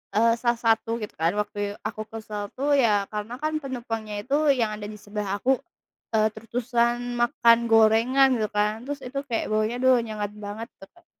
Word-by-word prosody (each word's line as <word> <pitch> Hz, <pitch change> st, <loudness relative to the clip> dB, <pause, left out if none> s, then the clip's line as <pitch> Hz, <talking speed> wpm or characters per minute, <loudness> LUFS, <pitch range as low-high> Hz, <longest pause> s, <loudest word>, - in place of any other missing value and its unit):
eee, 230 Hz, +2 st, +5 dB
salah 235 Hz, -1 st, +1 dB
satu 225 Hz, 0 st, +3 dB
gitu 210 Hz, -, -6 dB
kan 165 Hz, +2 st, +2 dB
waktu 205 Hz, 0 st, -7 dB, 0.3 s
aku 215 Hz, -, -6 dB
kesel 215 Hz, -2 st, -6 dB, 0.2 s
tu 265 Hz, -, -7 dB, 0.2 s
ya 205 Hz, -3 st, +2 dB
karena 210 Hz, +2 st, -4 dB
kan 310 Hz, -, 0 dB
penumpangnya 230 Hz, -5 st, -5 dB
itu 255 Hz, +6 st, -5 dB, 0.3 s
yang 225 Hz, -2 st, +2 dB
ada 210 Hz, -1 st, -7 dB
di -, -, -10 dB
sebelah 205 Hz, -1 st, -5 dB
aku, 255 Hz, -, +1 dB, 0.6 s
eee, 215 Hz, -1 st, +4 dB
terus-terusan 240 Hz, +2 st, -1 dB
makan 235 Hz, -1 st, +5 dB
gorengan 225 Hz, +5 st, +5 dB
gitu 215 Hz, -, 0 dB
kan, 210 Hz, +1 st, +2 dB
terus 285 Hz, 0 st, -5 dB
itu 275 Hz, +3 st, -7 dB
kayak 225 Hz, -, -1 dB
baunya 215 Hz, +2 st, +1 dB
duh 260 Hz, 0 st, +6 dB
nyengat 210 Hz, -2 st, -4 dB
banget 215 Hz, +3 st, -6 dB
tuh 195 Hz, -, -12 dB
Kak, 345 Hz, -1 st, -24 dB
225 Hz, 180 wpm, -25 LUFS, 210-240 Hz, 0.6 s, duh